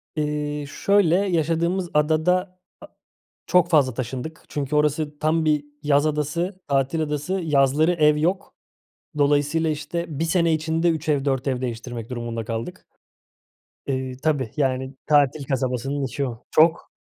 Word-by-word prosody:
Eee, 150 Hz, -1 st, -2 dB
şöyle, 195 Hz, +3 st, +2 dB
yaşadığımız 175 Hz, -1 st, 0 dB
adada 175 Hz, +5 st, +1 dB, 0.2 s
a -, -, -9 dB, 0.6 s
çok 180 Hz, -1 st, +3 dB
fazla 140 Hz, -6 st, +3 dB
taşındık. 130 Hz, +6 st, -5 dB
Çünkü 145 Hz, 0 st, -2 dB
orası 150 Hz, 0 st, 0 dB
tam 160 Hz, +2 st, +1 dB
bir 150 Hz, -2 st, +2 dB, 0.2 s
yaz 145 Hz, 0 st, +3 dB
adası, 155 Hz, +5 st, -2 dB
tatil 140 Hz, +3 st, +1 dB
adası. 150 Hz, +3 st, -3 dB
Yazları 150 Hz, +2 st, +3 dB
ev 150 Hz, -3 st, +4 dB
yok. 180 Hz, +6 st, -1 dB, 0.6 s
Dolayısıyla, 145 Hz, +3 st, +2 dB
işte, 155 Hz, +3 st, -3 dB
1 165 Hz, -, +1 dB
sene 170 Hz, -1 st, +2 dB
içinde 160 Hz, +2 st, +1 dB
3 160 Hz, -1 st, -2 dB
ev, 145 Hz, -2 st, +1 dB
4 135 Hz, -1 st, 0 dB
ev 130 Hz, -2 st, -1 dB
değiştirmek 120 Hz, -1 st, -5 dB
durumunda 120 Hz, -2 st, -4 dB
kaldık. 115 Hz, +10 st, -5 dB, 1.0 s
Eee, 130 Hz, -1 st, -3 dB
tabii, 145 Hz, -7 st, 0 dB
yani, 130 Hz, -1 st, -1 dB
tatil 145 Hz, -1 st, +3 dB
kasabasının 135 Hz, +1 st, -2 dB
içi 140 Hz, +2 st, -2 dB
o. 120 Hz, -2 st, -7 dB
Çok 160 Hz, +2 st, +3 dB
150 Hz, 135 wpm, -23 LUFS, 135-160 Hz, 1.0 s, ev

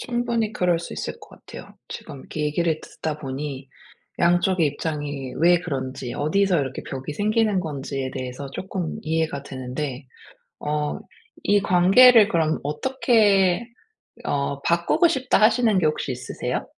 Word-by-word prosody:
충분히 240 Hz, -3 st, -1 dB
그럴 175 Hz, -2 st, +1 dB
수 170 Hz, -, -8 dB
있을 -, -, -5 dB
것 -, -, -14 dB, 0.2 s
같아요. -, -, -11 dB
지금 135 Hz, -, -8 dB
이렇게 150 Hz, -, -6 dB
얘기를 160 Hz, +1 st, 0 dB
듣다 155 Hz, -1 st, -5 dB
보니 135 Hz, -1 st, -6 dB, 0.5 s
양쪽의 175 Hz, 0 st, +3 dB
입장이 145 Hz, -3 st, -4 dB
왜 175 Hz, +1 st, +5 dB
그런지 130 Hz, -6 st, -5 dB
어디서 180 Hz, +3 st, +2 dB
이렇게 130 Hz, -1 st, -4 dB
벽이 135 Hz, +2 st, -5 dB
생기는 215 Hz, +1 st, +1 dB
건지에 140 Hz, -5 st, -4 dB
대해서 130 Hz, +1 st, -6 dB
쪼끔 185 Hz, -3 st, -4 dB
이해가 160 Hz, -3 st, -1 dB
되는데 130 Hz, 0 st, -5 dB, 0.5 s
어 150 Hz, 0 st, -2 dB, 0.5 s
'이 205 Hz, -1 st, +3 dB
관계를 205 Hz, +5 st, +7 dB
그럼 160 Hz, -2 st, +1 dB
어떻게 205 Hz, -, +2 dB, 0.6 s
어 140 Hz, 0 st, -1 dB
바꾸고 170 Hz, -, +3 dB
싶다.' 260 Hz, -8 st, +1 dB
하시는 225 Hz, -2 st, +4 dB
게 160 Hz, -, +1 dB
혹시 150 Hz, -3 st, -2 dB
있으세요? 125 Hz, -, -4 dB
160 Hz, 305 characters per minute, -23 LUFS, 140-200 Hz, 0.6 s, 관계를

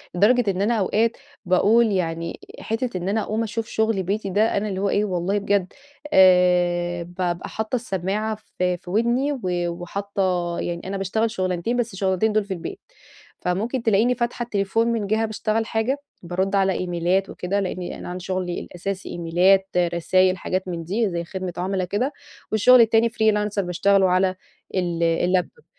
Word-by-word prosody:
لدرجة 215 Hz, +3 st, +4 dB
إن 190 Hz, 0 st, -3 dB
أنا 215 Hz, +4 st, +2 dB
أوقات 220 Hz, +4 st, +1 dB, 0.3 s
باقول 215 Hz, +5 st, +4 dB
يعني 165 Hz, -3 st, -2 dB, 0.2 s
حتة 225 Hz, -2 st, -2 dB
إن 185 Hz, +2 st, -3 dB
أنا 220 Hz, +2 st, +1 dB
أقوم 215 Hz, +2 st, -1 dB
أشوف 225 Hz, 0 st, -3 dB
شغل 220 Hz, -4 st, 0 dB
بيتي 200 Hz, +2 st, -2 dB
ده 210 Hz, +4 st, +2 dB
أنا 210 Hz, +1 st, -1 dB
اللي 190 Hz, -1 st, -3 dB
هو 200 Hz, -, +1 dB
إيه 205 Hz, +2 st, +1 dB
والله 185 Hz, +1 st, -1 dB
بجد 200 Hz, -2 st, 0 dB, 0.4 s
آآ 175 Hz, -2 st, +4 dB
بابقى 175 Hz, 0 st, -3 dB
حاطة 220 Hz, +3 st, -3 dB
السماعة 215 Hz, -1 st, -2 dB, 0.2 s
في 180 Hz, 0 st, +1 dB
في 175 Hz, -, -13 dB
ودني 235 Hz, +8 st, +1 dB
و 275 Hz, -, -5 dB, 0.3 s
وحاطة 180 Hz, 0 st, -2 dB
يعني 170 Hz, -1 st, -3 dB
أنا 195 Hz, -, -3 dB
باشتغل 220 Hz, +4 st, 0 dB
شغلانتين 185 Hz, +3 st, -1 dB
بس 235 Hz, -2 st, -1 dB
الشغلانتين 190 Hz, +3 st, +1 dB
دول 215 Hz, 0 st, +2 dB
في 195 Hz, -, -3 dB
البيت. 190 Hz, -, -7 dB, 0.6 s
فممكن 220 Hz, +8 st, -1 dB
تلاقيني 225 Hz, +3 st, +3 dB
فاتحة 240 Hz, 0 st, -2 dB
التليفون 225 Hz, 0 st, 0 dB
من 230 Hz, -3 st, -1 dB
جهة 220 Hz, +2 st, +1 dB
باشتغل 220 Hz, +1 st, -1 dB
حاجة، 225 Hz, +5 st, 0 dB, 0.3 s
بارُد 190 Hz, +3 st, -1 dB
على 195 Hz, -1 st, +3 dB
إيميلات 180 Hz, +2 st, 0 dB
وكده 195 Hz, +3 st, -2 dB
لأني 185 Hz, -2 st, -4 dB
أنا -, -, -7 dB
عندي 180 Hz, 0 st, -6 dB
شغلي 185 Hz, -1 st, -2 dB
الأساسي 190 Hz, +2 st, -5 dB
إيميلات 180 Hz, +3 st, +2 dB
رسايل 180 Hz, +2 st, +2 dB
حاجات 185 Hz, +1 st, -3 dB
من 170 Hz, -2 st, -4 dB
دي 200 Hz, +5 st, 0 dB
زي 170 Hz, -1 st, -3 dB
خدمة 185 Hz, +1 st, -5 dB
عملا 185 Hz, +1 st, -1 dB
كده. 235 Hz, -, -1 dB, 0.4 s
والشغل 235 Hz, +3 st, +6 dB
التاني 225 Hz, +1 st, +4 dB
freelancer 210 Hz, -2 st, +1 dB
باشتغله 190 Hz, +1 st, +2 dB
على 185 Hz, +1 st, +2 dB, 0.4 s
ال 175 Hz, -2 st, 0 dB
اللابتوب 180 Hz, -, 0 dB
195 Hz, 165 wpm, -23 LUFS, 180-220 Hz, 0.6 s, والشغل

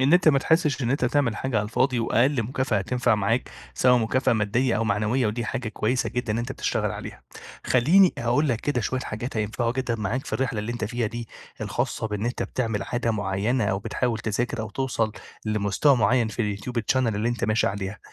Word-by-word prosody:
إن 135 Hz, +4 st, +3 dB
أنت 175 Hz, -2 st, +6 dB
ما 140 Hz, -3 st, +5 dB
تحسش 150 Hz, -3 st, +2 dB
إن 120 Hz, -, 0 dB
أنت 135 Hz, -1 st, +1 dB
تعمل 125 Hz, -3 st, +1 dB
حاجة 130 Hz, -1 st, -2 dB
على 105 Hz, -, +1 dB
الفاضي، 125 Hz, +4 st, +1 dB
وأقل 120 Hz, +3 st, +2 dB
مكافأة 125 Hz, -1 st, 0 dB
هتنفع 120 Hz, +3 st, +1 dB
معاك، 105 Hz, +4 st, 0 dB, 0.2 s
سواء 125 Hz, -1 st, +4 dB
مكافأة 120 Hz, +3 st, +1 dB
مادية 115 Hz, +3 st, +1 dB
أو 115 Hz, -, 0 dB
معنويّة، 110 Hz, +4 st, +1 dB
ودي 115 Hz, +3 st, -2 dB
حاجة 110 Hz, +1 st, -3 dB
كويّسة 110 Hz, +4 st, 0 dB
جدًا 120 Hz, -2 st, -2 dB
إن 110 Hz, -, -1 dB
أنت 120 Hz, +3 st, -3 dB
تشتغل -, -, -1 dB
عليها. -, -, -8 dB, 0.4 s
خلّيني 170 Hz, +10 st, +5 dB
أقول 125 Hz, +6 st, +1 dB
لك 120 Hz, -3 st, 0 dB
كده 145 Hz, -4 st, 0 dB
شويّة 130 Hz, +3 st, -1 dB
حاجات 120 Hz, 0 st, -5 dB
هينفعوا 110 Hz, +2 st, -1 dB
جدًا 125 Hz, -2 st, -1 dB
معاك 115 Hz, +4 st, -2 dB
في -, -, -8 dB
الرحلة 125 Hz, -4 st, -1 dB
اللي 110 Hz, +3 st, -3 dB
أنت 120 Hz, -2 st, -3 dB
فيها 115 Hz, +1 st, -1 dB
دي 115 Hz, +1 st, -6 dB, 0.3 s
الخاصة 110 Hz, -, -2 dB
بإن 105 Hz, 0 st, -3 dB
أنت 120 Hz, -, -2 dB
بتعمل 110 Hz, -5 st, -2 dB
عادة 120 Hz, +2 st, -1 dB
معيّنة 105 Hz, +3 st, 0 dB
أو 95 Hz, -1 st, 0 dB
بتحاول 115 Hz, +3 st, -1 dB
تذاكر 115 Hz, +2 st, -2 dB
أو 110 Hz, -1 st, -5 dB
توصل 115 Hz, -3 st, -1 dB, 0.3 s
لمستوى 110 Hz, +6 st, +2 dB
معيّن 115 Hz, +1 st, +3 dB
في 105 Hz, -3 st, -2 dB
الYouTube 120 Hz, +4 st, -3 dB
channel -, -, -3 dB, 0.2 s
اللي 105 Hz, +3 st, 0 dB
أنت 120 Hz, -1 st, -1 dB
ماشي 110 Hz, +1 st, +2 dB
عليها. 100 Hz, +1 st, -3 dB
120 Hz, 205 wpm, -25 LUFS, 110-130 Hz, 0.4 s, أنت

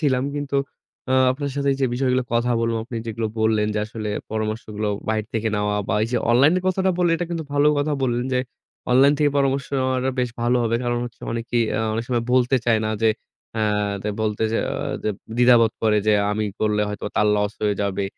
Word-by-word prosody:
ছিলাম। 130 Hz, -4 st, +1 dB
কিন্তু 145 Hz, -1 st, -2 dB, 0.5 s
আ -, -, +3 dB, 0.2 s
আপনার 140 Hz, +2 st, -3 dB
সাথে 140 Hz, 0 st, 0 dB
এই -, -, -3 dB
যে 130 Hz, -, +3 dB
বিষয়গুলো 130 Hz, 0 st, +1 dB
কথা 120 Hz, +1 st, +1 dB
বললাম, 115 Hz, 0 st, 0 dB
আপনি 120 Hz, 0 st, -7 dB
যেগুলো 115 Hz, 0 st, -2 dB
বললেন 110 Hz, -1 st, +2 dB
যে -, -, 0 dB
আসলে 110 Hz, -1 st, -5 dB, 0.2 s
পরামর্শগুলো 110 Hz, -1 st, -3 dB, 0.2 s
বাইরে 110 Hz, -1 st, 0 dB
থেকে 110 Hz, 0 st, 0 dB
নেওয়া, 105 Hz, 0 st, 0 dB
বা -, -, +1 dB
এই 110 Hz, -, 0 dB
যে -, -, +2 dB
online 135 Hz, +7 st, +5 dB
এর 185 Hz, -, -7 dB
কথাটা 190 Hz, 0 st, +1 dB
বললেন, 175 Hz, -2 st, +3 dB
এটা 175 Hz, -, -3 dB
কিন্তু 165 Hz, -2 st, -3 dB
ভালো 145 Hz, +1 st, +3 dB
কথা 145 Hz, +1 st, 0 dB
বললেন 120 Hz, -1 st, 0 dB
যে, 125 Hz, -, +2 dB, 0.5 s
online 135 Hz, +3 st, +6 dB
থেকে 150 Hz, -1 st, +3 dB
পরামর্শ 140 Hz, 0 st, +1 dB
নেওয়াটা 130 Hz, 0 st, 0 dB
বেশ 125 Hz, -1 st, -1 dB
ভালো 120 Hz, +1 st, +2 dB
হবে। 115 Hz, 0 st, +1 dB
কারণ 120 Hz, 0 st, 0 dB
হচ্ছে 120 Hz, -1 st, -10 dB
অনেকেই 115 Hz, 0 st, 0 dB, 0.2 s
আ -, -, +1 dB
অনেক 115 Hz, +2 st, -2 dB
সময় 120 Hz, -2 st, 0 dB
বলতে 130 Hz, +1 st, +3 dB
চায় 115 Hz, -2 st, +4 dB
না 110 Hz, -, -1 dB
যে 110 Hz, -, +5 dB, 0.5 s
আ -, -, 0 dB, 0.4 s
দে 105 Hz, -, -2 dB
বলতে 105 Hz, 0 st, -1 dB
যে 115 Hz, -, +1 dB
আ -, -, -3 dB, 0.3 s
দ -, -, -17 dB, 0.3 s
দ্বিধাবোধ 120 Hz, -2 st, +5 dB
করে 110 Hz, -1 st, +3 dB
যে 110 Hz, -, +5 dB, 0.2 s
আমি 105 Hz, +1 st, -1 dB, 0.2 s
করলে 105 Hz, -1 st, +1 dB
হয়তো 105 Hz, -, -6 dB
তার 105 Hz, -, +3 dB
loss 105 Hz, 0 st, 0 dB
হয়ে 105 Hz, -1 st, +2 dB
যাবে। 100 Hz, 0 st, -1 dB
120 Hz, 215 wpm, -22 LUFS, 110-130 Hz, 0.5 s, online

